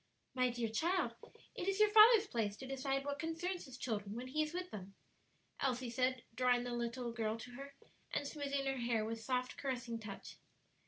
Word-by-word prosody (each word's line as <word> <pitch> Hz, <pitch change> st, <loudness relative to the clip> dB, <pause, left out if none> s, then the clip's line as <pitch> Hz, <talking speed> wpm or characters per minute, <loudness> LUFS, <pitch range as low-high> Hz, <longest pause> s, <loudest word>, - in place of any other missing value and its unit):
"My 255 Hz, -1 st, +3 dB
dear 240 Hz, -1 st, -1 dB
child, 340 Hz, -, +1 dB, 0.4 s
it 355 Hz, -, -4 dB
is 390 Hz, +1 st, +1 dB
your 425 Hz, -1 st, +6 dB
father's 440 Hz, 0 st, +9 dB
place 220 Hz, -, -1 dB
to 265 Hz, -, -7 dB
decide 270 Hz, +1 st, -1 dB
what 285 Hz, 0 st, -2 dB
concerns 335 Hz, +3 st, -2 dB
his 260 Hz, -2 st, -10 dB
children, 210 Hz, -5 st, -3 dB
when 250 Hz, +2 st, -5 dB
he 305 Hz, +4 st, +1 dB
is 305 Hz, 0 st, -1 dB
with 360 Hz, +1 st, -4 dB
them," 195 Hz, -1 st, -8 dB, 0.6 s
Elsie 250 Hz, -2 st, 0 dB
said, 255 Hz, 0 st, +1 dB
drawing 245 Hz, 0 st, +3 dB
the 245 Hz, 0 st, -3 dB
little 235 Hz, 0 st, -2 dB
girl 225 Hz, -1 st, -1 dB
to 245 Hz, +2 st, -9 dB
her 275 Hz, +3 st, -9 dB, 0.4 s
and 290 Hz, -, -1 dB
smoothing 280 Hz, -2 st, -2 dB
her 270 Hz, 0 st, 0 dB
hair 235 Hz, -3 st, +1 dB
with 225 Hz, 0 st, -4 dB
soft, 250 Hz, +1 st, -1 dB
caressing 245 Hz, -4 st, -3 dB
touch. 210 Hz, -3 st, -8 dB
255 Hz, 195 wpm, -37 LUFS, 235-285 Hz, 0.6 s, father's